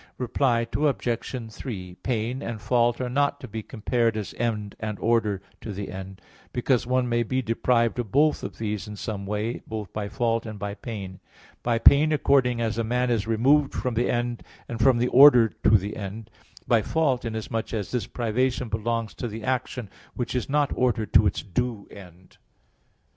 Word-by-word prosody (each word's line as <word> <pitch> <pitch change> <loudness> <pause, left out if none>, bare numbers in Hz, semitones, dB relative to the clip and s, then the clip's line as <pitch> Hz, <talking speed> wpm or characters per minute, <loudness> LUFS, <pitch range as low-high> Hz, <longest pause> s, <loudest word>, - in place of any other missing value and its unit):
Reply 120 -1 +1
Obj. 125 -4 -1
3: 95 -7 -7
Pain 120 +2 -2
and 115 -4 -4
fault 120 +1 +2
are 130 - -1
not 140 +3 +1
to - - -8
be 110 +1 -5
compared 115 0 0
as 105 - -5
end 105 -3 -2
and 105 -2 -4
order 110 -4 +1 0.2
to 110 - -6
the 100 0 -5
end; 95 0 -8 0.3
because 125 -1 +1
one 130 0 +1
may 120 0 +1
be 130 +3 -1
deprived 115 +1 +1
of 115 -5 -3
both 150 +3 +3
of - - -7
these 105 -1 -3
in 105 - -7
some 100 -2 -5
way, 105 +3 -2
both 110 -3 -6
by 105 -1 -3
fault 115 +1 0
and 110 -1 -6
by 100 0 -4
pain; 100 -5 -7 0.4
by 120 -1 +1
pain, 145 +6 +6
accordingly 130 -5 +2
as 110 0 -1
a - - +1
man 125 +2 0
is 110 -3 0
removed 135 +6 +3
from 125 -2 -1
the 120 +2 +1
end 120 0 -1 0.3
and 115 - -5
from 125 +1 +5
the 120 +1 +2
order 125 -4 +8
to 110 - +3
the 100 +2 -5
end; 105 +2 -7 0.4
by 115 -2 +4
fault, 135 0 +1
inasmuch 110 -1 -3
as 105 -4 -3
this 125 -5 -2
privation 125 +1 -1
belongs 115 0 -2
to 120 - -4
the 110 0 -7
action 125 -2 -2 0.3
which 120 - -3
is 125 +1 -2
not 145 0 +2
ordered 115 -4 0
to 110 - +6
its - - -2
due 115 0 -2
end. 90 -2 -14
115 Hz, 185 wpm, -25 LUFS, 105-125 Hz, 0.4 s, order